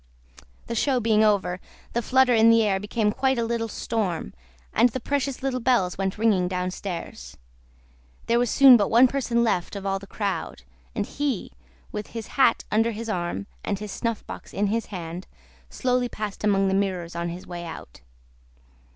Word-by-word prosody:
The - - -4
show 255 +3 +1
being 220 -2 +3
over, 190 -4 +2 0.3
the 235 - +1
flutter 260 +1 +3
in 225 0 +6
the 230 0 +5
air 195 -2 +1
became 210 +1 0
quite 265 +3 +1
a 235 - +1
little 230 0 -1
storm, 210 -6 -3 0.4
and 245 - +5
the 260 - -4
precious 275 0 -2
little 265 -2 -1
bells 230 -8 +2
went 195 +1 -2
ringing 210 -5 +2
downstairs. 180 - -5 0.9
There 235 +1 +2
was 245 -1 +1
soon 270 -3 +8
but 205 -3 +1
one 240 +3 +6
person 240 -3 0
left 195 -4 0
of 200 -1 -6
all 195 0 0
the 200 - -12
crowd, 200 - -4 0.3
and - - -1
he, 285 -8 -3 0.4
with 210 0 -5
his 225 - -6
hat 260 -4 +3
under 225 +2 +3
his 225 0 -5
arm 175 0 -2 0.2
and 200 - -1
his 210 0 -7
snuff 230 0 -3
box - - -9
in 205 - +1
his 230 -1 -1
hand, 175 -2 -7 0.4
slowly 250 -1 0
passed 215 -2 -6
among 195 -2 +3
the 190 - +1
mirrors 185 -4 -1
on 170 0 -2
his 175 +2 -7
way 175 -1 -7
out. 160 - -9
215 Hz, 180 wpm, -25 LUFS, 190-235 Hz, 0.9 s, soon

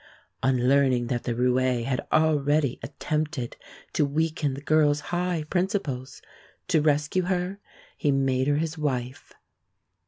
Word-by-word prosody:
On 125 -2 +2
learning 130 -3 +3
that 120 - -3
the 120 - -1
roué 125 0 +1
had 130 -1 -1
already 150 -3 +2
attempted 150 -3 -3 0.4
to - - +2
weaken 150 -1 0
the 140 - -8
girl's 150 -1 +3
high 175 -2 0
principles, 160 - -2 0.5
to 165 -5 +3
rescue 150 +4 +2
her 185 +1 -1 0.4
he 145 - 0
made 135 -1 +1
her 145 0 +2
his 160 +1 -2
wife. 130 -4 -3
145 Hz, 130 wpm, -26 LUFS, 130-155 Hz, 0.5 s, learning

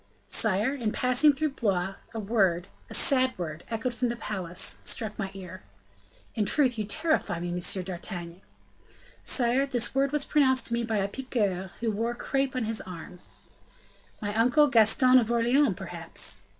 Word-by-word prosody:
"Sire, 220 +4 +3
in 235 -6 -2
passing 255 +6 +3
through 300 +1 -2
Blois, 195 -7 -1 0.2
a 225 - -6
word, 195 -4 0 0.2
a - - -9
sad 260 -2 +3
word, 165 -2 -6
echoed 230 +2 -2
from 245 0 -1
the 235 - -3
palace, 190 -5 0
struck 220 -3 -1
my 195 -2 -3
ear." 185 -1 -9 0.7
"In 220 - -1
truth, 250 -2 +1
you 210 - -2
terrify 310 - -1
me, 175 +1 -4
M. 180 +2 0
d'Artagnan." 175 -1 -7 0.8
"Sire, 255 +2 +2
this 245 -4 0
word 270 +1 +1
was 295 -1 +1
pronounced 260 -5 +2
to 235 - 0
me 235 0 0
by 225 -2 -2
a 195 -1 0
piqueur, 200 -6 -3
who 230 -2 0
wore 230 +3 -2
crape 270 +2 -2
on 255 - -1
his 225 0 -2
arm." 180 0 -10 1.0
"My 205 0 -3
uncle, 245 +7 +4
Gaston 255 +2 +5
of 230 -2 -2
Orleans, 240 +5 +2
perhaps." - - -2
225 Hz, 165 wpm, -27 LUFS, 195-255 Hz, 1.0 s, Gaston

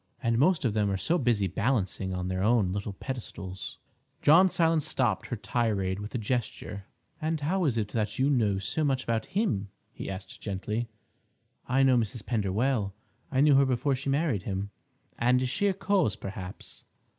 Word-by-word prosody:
And 115 0 +2
most 160 0 +3
of 115 - +1
them 105 -1 +1
are 95 - 0
so 170 - +1
busy 115 -6 +2
balancing 95 -1 0
on 90 0 -2
their 95 0 -1
own 105 -3 +3
little 100 0 -3
pedestals—" 95 -6 -6 0.5
John 175 +6 +7
Silence 165 -3 +2
stopped 120 -7 0
her 125 - -3
tirade 100 -4 -1
with 105 +4 -7
a - - +2
gesture. 105 -3 -3 0.4
"And 160 0 0
how 180 +5 +1
is 125 -6 +1
it 105 -2 -1
that 105 -1 -2
you 130 - +3
know 110 -8 +2
so 100 +11 -1
much 135 -3 +1
about 115 -1 -1
him?" 105 - 0 0.2
he - - -7
asked 95 0 -8
gently. 105 +3 -3 0.8
"I 135 +2 +3
know 130 -2 +5
Mrs. 110 -1 -2
Pender 105 -6 0
well—I 110 +2 -1
knew 145 0 +6
her 135 0 +6
before 130 +2 +1
she 135 +2 -3
married 140 - +1
him—" 100 +1 -4 0.5
"And 125 +2 +4
is 130 0 -1
she 200 +8 +1
a 195 - +2
cause, 190 - +1
perhaps?" 95 -1 -8
115 Hz, 180 wpm, -28 LUFS, 100-135 Hz, 0.8 s, John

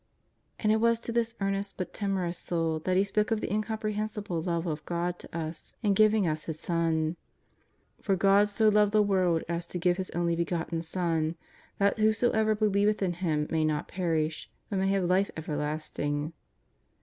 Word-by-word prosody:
And 215 - +1
it 220 - +4
was 230 +1 +3
to 235 - -4
this 230 0 0
earnest 195 0 -2
but 180 -2 -4
timorous 185 -4 -1
soul 165 -2 -1
that 185 0 +2
He 195 - +5
spoke 210 +1 0
of 225 -2 +1
the 205 - -3
incomprehensible 215 -4 -2
love 170 0 -1
of 155 -2 -3
God 175 +1 -2
to - - -8
us 160 0 -6
in 205 -2 +3
giving 215 -1 +4
us 155 -1 -2
His 160 -1 -5
Son: 165 -1 0 0.4
" - - -38
For 195 - +1
God 195 +2 +4
so 215 +1 +2
loved 210 0 +3
the 215 -1 +5
world 185 -5 +2
as 170 0 -3
to 180 - -5
give 175 0 +2
His 190 -1 -3
Only 170 0 0
Begotten 170 -1 -2
Son 165 -1 -1 0.4
that 200 +2 +2
whosoever 220 0 +3
believeth 210 0 +2
in 180 -2 +1
Him 160 -4 0
may 160 -1 +2
not 155 -1 0
perish, 160 -4 -1 0.2
but 195 - 0
may 190 - +1
have 195 -1 +2
Life 185 +3 +2
Everlasting." 150 -1 -3
185 Hz, 185 wpm, -29 LUFS, 165-210 Hz, 0.4 s, He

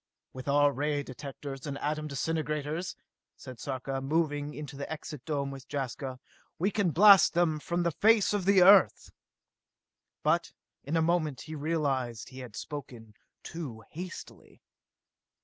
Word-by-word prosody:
"With 130 +1 -9
our 145 0 +4
ray 145 +1 -1
directors 135 +1 -8
and 140 -1 -4
atom 150 +1 -2
disintegrators," 150 +3 -2 0.4
said 130 -4 -10
Sarka, 135 0 -4
moving 145 0 -1
into 150 -1 -7
the 140 +2 -6
Exit 150 -3 -7
Dome 140 -3 -2
with 135 -2 -10
Jaska, 130 -1 -4 0.4
"we 195 +5 +1
can 200 -3 +1
blast 195 +2 +7
them 165 -3 +2
from 175 +3 -1
the 170 - +1
face 215 +4 +4
of 200 -3 -1
the 195 -2 +6
Earth!" 195 +1 +6 1.1
But - - +1 0.3
in 155 +4 -1
a 160 - +3
moment 160 -5 0
he 160 - -8
realized 140 -7 -1
that - - -15
he 130 - -10
had 125 -5 -9
spoken 125 -7 -8 0.3
too 135 -10 -7
hastily. 180 +3 -9
150 Hz, 150 wpm, -29 LUFS, 135-165 Hz, 1.1 s, blast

